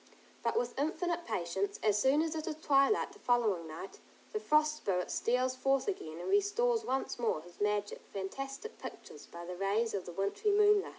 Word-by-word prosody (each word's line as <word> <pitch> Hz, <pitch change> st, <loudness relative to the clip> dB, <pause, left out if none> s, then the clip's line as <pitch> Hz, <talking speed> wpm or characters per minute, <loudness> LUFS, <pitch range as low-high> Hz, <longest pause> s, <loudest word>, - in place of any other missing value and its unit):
But -, -, 0 dB
with 470 Hz, -, -1 dB
infinite 340 Hz, +3 st, -1 dB
patience, 185 Hz, +3 st, -2 dB
as 210 Hz, -2 st, +4 dB
soon 275 Hz, +7 st, +4 dB
as 325 Hz, -1 st, -2 dB
it 315 Hz, -1 st, -4 dB
is 315 Hz, -, -2 dB
twilight 285 Hz, +4 st, +3 dB
the -, -, -15 dB
following 215 Hz, -9 st, +2 dB
night, 160 Hz, +5 st, -8 dB, 0.3 s
the 430 Hz, -, 0 dB
Frost 305 Hz, -6 st, +3 dB
Spirit 180 Hz, -9 st, -1 dB
steals 255 Hz, +2 st, +1 dB
forth 270 Hz, +3 st, +1 dB
again 160 Hz, -, -3 dB
and 175 Hz, -, -6 dB
restores 430 Hz, +4 st, +2 dB
once 265 Hz, -, -2 dB
more 220 Hz, -10 st, 0 dB
his 175 Hz, +2 st, -15 dB
magic, 205 Hz, 0 st, 0 dB
fantastic 275 Hz, -, -5 dB
pictures -, -, -9 dB
by 170 Hz, 0 st, -9 dB
the 180 Hz, +1 st, -5 dB
rays 205 Hz, +5 st, +1 dB
of 190 Hz, -3 st, -3 dB
the -, -, -5 dB
wintry 200 Hz, -, 0 dB
moonlight. 415 Hz, 0 st, +5 dB
265 Hz, 185 wpm, -33 LUFS, -, 0.3 s, moonlight